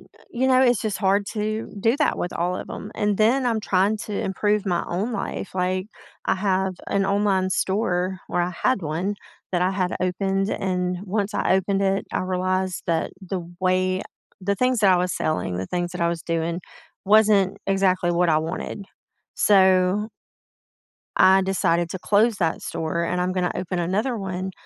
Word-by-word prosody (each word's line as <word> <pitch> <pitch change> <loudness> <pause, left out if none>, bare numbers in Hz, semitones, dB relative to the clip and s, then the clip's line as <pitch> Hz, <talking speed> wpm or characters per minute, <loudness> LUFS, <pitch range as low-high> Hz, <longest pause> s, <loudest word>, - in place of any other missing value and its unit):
y - - -18 0.2
you 255 +2 0
know, 260 0 +5
it's 245 -3 +4
just 215 -3 -2
hard 200 0 +2
to 215 +1 -3
do 230 +6 +3
that 305 - +1
with 175 - -3
all 175 +2 -1
of - - -7
‘em, 210 - -7
and 205 -1 0
then 245 +4 +3
I'm 225 -2 +1
trying 200 +2 +2
to 210 - -6
improve 205 +1 0
my 175 -2 0
own 205 +8 -2
life, 200 -2 -4
like, 185 +1 -1 0.4
I - - +3
have 190 -1 0
an 195 -1 +1
online 195 -2 +1
store 185 -1 0
well 175 - 0
I 180 - -5
had 255 -6 +2
one 165 +6 -2 0.4
that 180 0 +1
I 185 - +2
had 185 -2 -1
opened, 195 +2 0
and 180 -1 -1
once 205 +1 -1
I - - +2
opened 195 +1 0
it, 195 0 +1
I - - 0
realized 185 0 -1
that 165 -2 0
the 190 0 -3 0.2
way 185 +1 +1 0.4
the 200 +2 0
things 250 +4 +1
that 195 -2 +5
I - - +4
was 180 0 0
selling, 155 - -1
the 95 - -3
things 175 - -2
that 180 - -6
I 170 - +3
was 170 -1 -3
doing 165 +1 -2 0.4
wasn't 205 -2 +4
exactly 185 -2 +2
what 175 0 +2
I 155 - +4
wanted, 165 +5 -5 0.5
so 190 +1 +4 1.1
I 190 +1 +6
decided 175 -3 +1
to 185 - -5
close 215 +3 +3
that 165 -2 0
store, 165 +1 -2
and 180 +1 -1
I'm 180 +1 0
gonna 180 -1 0
open 180 0 -3
another 210 +8 0
one 190 -1 -4
190 Hz, 185 wpm, -23 LUFS, 180-205 Hz, 1.1 s, I